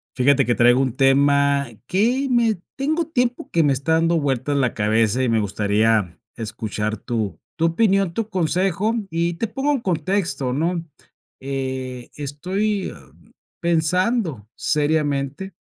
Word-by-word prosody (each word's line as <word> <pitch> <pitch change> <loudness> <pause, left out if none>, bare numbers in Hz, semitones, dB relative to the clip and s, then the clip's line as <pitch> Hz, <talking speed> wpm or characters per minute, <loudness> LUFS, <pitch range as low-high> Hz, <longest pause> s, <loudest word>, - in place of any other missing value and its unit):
Fíjate 135 +1 +3
que 120 - +2
traigo 120 +1 +4
un 130 -3 0
tema 140 +1 +3 0.2
que 245 +8 +1
me 230 -5 +2 0.2
tengo 310 +5 0
tiempo 250 -5 -1
que 165 - +2
me 145 -2 +3
está 140 +5 0
dando 165 +1 +3
vueltas 140 -1 -1
la 130 -4 +1
cabeza, 110 +3 +2
y 125 - +1
me 115 -1 +2
gustaría 105 -2 +1 0.2
escuchar 110 -1 -3
tu 110 -5 -3 0.2
tu 165 - +1
opinión, 195 +1 +2
tu 220 +3 -3
consejo. 190 +3 0 0.2
Y 170 0 -1
te 230 - -2
pongo 270 +7 -1
en 275 - 0
contexto, 165 - -1
¿no? 165 +4 -1 0.6
Eh, 130 -2 -4
estoy 185 +8 -2 0.7
pensando 170 - 0
seriamente 145 +2 0
145 Hz, 135 wpm, -22 LUFS, 130-190 Hz, 0.7 s, traigo